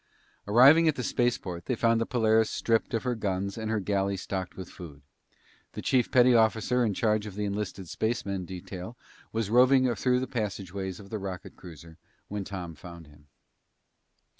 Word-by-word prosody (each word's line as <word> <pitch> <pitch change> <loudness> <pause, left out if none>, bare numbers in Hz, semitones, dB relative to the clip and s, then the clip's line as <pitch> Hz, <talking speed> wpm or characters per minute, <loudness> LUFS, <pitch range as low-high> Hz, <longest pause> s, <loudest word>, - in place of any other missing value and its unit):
Arriving 135 +10 +7
at 155 - +3
the 125 - -4
spaceport, 115 -9 -1
they 125 - 0
found 115 0 +2
the 115 - -1
Polaris 110 -2 +2
stripped 115 +1 0
of 115 - -2
her 125 -1 0
guns 100 -3 -2
and 110 -1 -4
her 110 -1 0
galley 100 0 -1
stocked 95 -1 -5
with 95 - -7
food. 75 -5 -11 0.7
The - - -6
chief 125 -3 +2
petty 125 0 +5
officer 115 +2 +3
in 105 -4 0
charge 105 0 +1
of 100 - -9
the 105 0 -2
enlisted 100 -2 -4
spacemen 100 -2 -2
detail 95 +5 -8 0.3
was 110 -2 -2
roving 130 +1 +5
through 125 +4 +1
the 130 - -2
passageways 100 -5 -4
of 100 -1 -13
the 110 - -3
rocket 95 -2 -7
cruiser 80 -2 -13 0.3
when 105 -1 -3
Tom 90 -4 -6
found 85 +2 -11
him. 75 0 -20
105 Hz, 175 wpm, -28 LUFS, 95-115 Hz, 0.7 s, Arriving